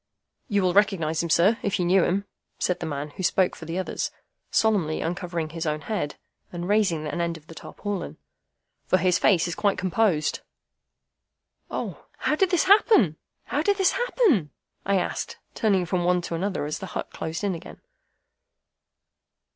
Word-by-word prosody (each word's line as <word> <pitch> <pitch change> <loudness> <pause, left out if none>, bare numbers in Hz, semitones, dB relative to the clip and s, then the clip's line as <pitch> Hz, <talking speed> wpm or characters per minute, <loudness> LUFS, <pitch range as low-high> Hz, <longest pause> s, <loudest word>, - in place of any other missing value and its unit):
"You 205 -5 +1
will 180 -1 +2
recognise 180 -6 +2
him, 170 - -3
sir, 190 +8 +4
if 200 - 0
you 180 - 0
knew 185 +1 +4
him," 200 +3 0 0.3
said 180 - 0
the 165 - -4
man 145 0 -4
who 185 - -8
spoke 185 0 +2
for 160 - -10
the 165 +2 -4
others, 190 - -2 0.4
solemnly 195 -8 +2
uncovering 170 -2 -3
his 165 +1 -4
own 150 0 -1
head, 175 -6 -3 0.4
and 175 0 -5
raising 195 -7 +2
an 150 +3 -2
end 170 -1 -1
of 155 - -18
the 165 - -11
tarpaulin, 205 +3 -5 0.7
"for 185 - +4
his 180 0 +2
face 180 -4 +4
is 170 - -3
quite 200 +2 +1
composed." 185 -4 +1 1.3
"O, - - -5
how - - 0
did 370 +4 +3
this 355 -3 +3
happen, 380 - +5 0.3
how 290 - -1
did 405 +5 +2
this 385 -2 +4
happen?" 415 - +2 0.4
I 200 - +3
asked, 180 - -3 0.2
turning 195 -6 +2
from 175 0 0
one 180 0 +2
to 170 - -5
another 185 -1 -1
as 150 - -3
the 190 - -6
hut - - -5
closed 160 +4 -5
in 200 -2 +1
again. 165 - -9
180 Hz, 175 wpm, -25 LUFS, 165-205 Hz, 1.3 s, happen